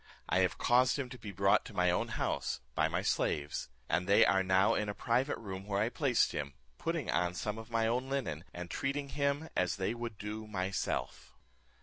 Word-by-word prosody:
I - - +2
have 90 -4 +2
caused 125 +2 +4
him 135 -3 -3
to 125 - -9
be 105 -2 -7
brought 100 +1 +3
to - - -10
my 90 0 +3
own 90 - 0
house, - - -2
by - - +2
my - - -1
slaves; 75 0 0 0.2
and 90 +2 0
they 100 - +6
are 95 +2 +4
now 95 +1 +4
in 105 -1 0
a 100 - -3
private 125 +3 +1
room 95 -2 -7
where 100 -1 0
I 110 +3 +2
placed 130 -2 +2
him, 70 -2 -4 0.2
putting 165 -7 -1
on 90 0 +1
some 105 +4 -3
of 110 +1 -10
my 115 -1 +1
own 125 +4 0
linen, 85 - -2
and 85 -1 -7
treating 140 +1 -2
him 140 +2 0
as 90 -1 +1
they 95 +3 -1
would 120 -3 -5
do 105 +1 -5
myself." 95 -2 -3
105 Hz, 210 wpm, -33 LUFS, 90-125 Hz, 0.2 s, they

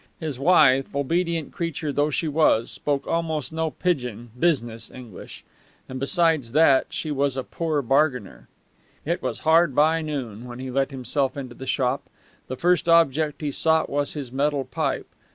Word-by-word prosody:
His 150 -6 -5
wife, 135 -4 +4
obedient 165 +2 -1
creature 160 -3 -3
though 145 +2 +1
she 155 +3 -1
was, 150 -7 +2
spoke 140 -2 -2
almost 160 -3 -2
no 160 0 -1
pidgin 125 - -3
business 120 -9 0
English; 120 -7 -11 0.4
and 130 0 -6
besides 155 -4 +1
that, 145 -3 +5
she 155 - -4
was 140 -1 0
a 130 - -2
poor 155 -2 -2
bargainer. 135 -4 0 0.6
It - - -1
was - - -4
hard 160 -3 +4
by 160 +2 +3
noon 125 -8 -5
when 120 0 -8
he 130 0 -6
let 135 +1 0
himself 135 +1 -2
into 130 -3 -6
the 130 +2 -9
shop. 130 0 0 0.5
The 130 - -5
first 175 -1 +2
object 155 -2 +3
he 150 -2 -2
sought 160 +3 +1
was 145 0 -1
his 140 -5 -6
metal 140 +1 0
pipe. - - -2
145 Hz, 165 wpm, -24 LUFS, 130-160 Hz, 0.6 s, that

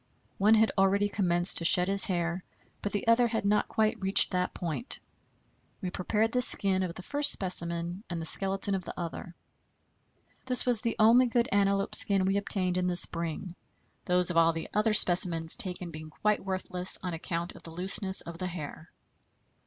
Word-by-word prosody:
One 210 +3 +3
had 220 0 +1
already 200 +1 +1
commenced 175 -3 0
to 170 - -6
shed 180 +2 +5
his 195 0 +2
hair, 175 -1 -4 0.4
but 205 - -5
the 205 - -5
other 235 +1 +3
had 225 -3 -4
not 210 +1 0
quite 220 +1 -2
reached 190 +1 +3
that 180 -1 -2
point. 175 - -2 0.8
We 185 -4 -6
prepared 210 +4 -2
the 250 - -1
skin 195 -5 +4
of 180 -2 -5
the 185 - -11
first 290 +7 +2
specimen 175 0 -3
and 170 -2 -5
the 165 - -7
skeleton 195 +3 -2
of 190 -1 -4
the - - -10
other. 170 0 -8 1.1
This 250 -1 +2
was 240 -4 -1
the 230 -2 -3
only 235 +4 +4
good 240 +1 -1
antelope 200 0 -1
skin 195 -2 +3
we 195 +1 -1
obtained 185 -3 -1
in 180 - -2
the 180 - -2
spring, 170 +1 -2 0.5
those 180 0 +3
of 170 - -4
all 165 0 +3
the 165 - -7
other 215 +1 0
specimens 175 -4 +7
taken 180 -2 -5
being 155 0 -11
quite 210 +6 -3
worthless 185 -1 -1
on 180 -2 -5
account 170 +1 -6
of - - -16
the - - -10
looseness 190 +3 +1
of 170 0 -11
the 185 - -4
hair. 165 -2 -9
185 Hz, 185 wpm, -27 LUFS, 175-205 Hz, 1.1 s, specimens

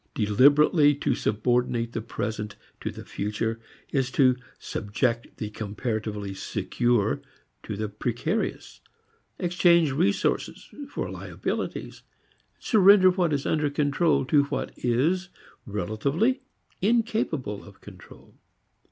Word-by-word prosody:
Deliberately 145 - +5
to 140 - 0
subordinate 120 +1 0
the 115 - -2
present 105 -2 -4 0.2
to - - -3
the - - -9
future 110 +2 -3 0.3
is 135 -2 +1
to 130 -1 +4 0.2
subject 115 +3 -2
the 105 -1 -5
comparatively 105 -1 -4
secure 105 - 0 0.4
to 105 - -6
the 110 +1 -2
precarious, 120 - -3 0.6
exchange 170 -3 +3
resources 180 +9 0 0.2
for - - -4
liabilities, - - -4 0.6
surrender 200 -3 +6
what 180 -3 +1
is 140 -2 -1
under 150 -2 +1
control 145 +2 +1
to 145 +1 +3
what 140 -1 -4
is, 160 +11 0 0.4
relatively, 140 - 0 0.4
incapable 205 - 0
of 100 - -15
control. - - -14
130 Hz, 105 wpm, -26 LUFS, 110-165 Hz, 0.6 s, surrender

